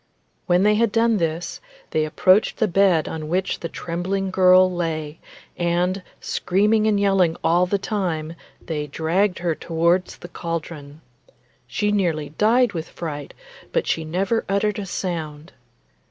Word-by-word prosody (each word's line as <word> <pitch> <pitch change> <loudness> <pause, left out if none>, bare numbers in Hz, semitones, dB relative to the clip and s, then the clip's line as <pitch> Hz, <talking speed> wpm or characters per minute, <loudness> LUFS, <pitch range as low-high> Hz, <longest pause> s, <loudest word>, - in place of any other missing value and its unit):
When 180 +1 +3
they 210 +1 +4
had 225 0 +2
done 230 0 +2
this, 165 -1 -3 0.3
they 155 0 +1
approached 185 +6 +3
the 220 - +2
bed 180 -4 +3
on 155 -1 -5
which 185 +3 -1
the 165 - -5
trembling 185 +4 -3
girl 185 0 +5
lay, 160 -3 -3 0.4
and, 175 +2 0 0.2
screaming 210 +4 +1
and 210 -2 +2
yelling 195 -4 +2
all 175 +2 +3
the 200 - +1
time, 175 -6 -3 0.3
they 150 -2 -3
dragged 175 +7 0
her 170 -1 -1
towards 170 +3 0
the - - -10
cauldron. 160 -4 -6 0.7
She 210 0 -1
nearly 165 -8 0
died 235 +1 +3
with 165 -2 -5
fright, 145 -4 -6 0.4
but - - 0
she 165 - -1
never 190 +8 -1
uttered 210 +2 0
a 200 - -5
sound. 160 -4 -5
180 Hz, 145 wpm, -22 LUFS, 160-195 Hz, 0.7 s, girl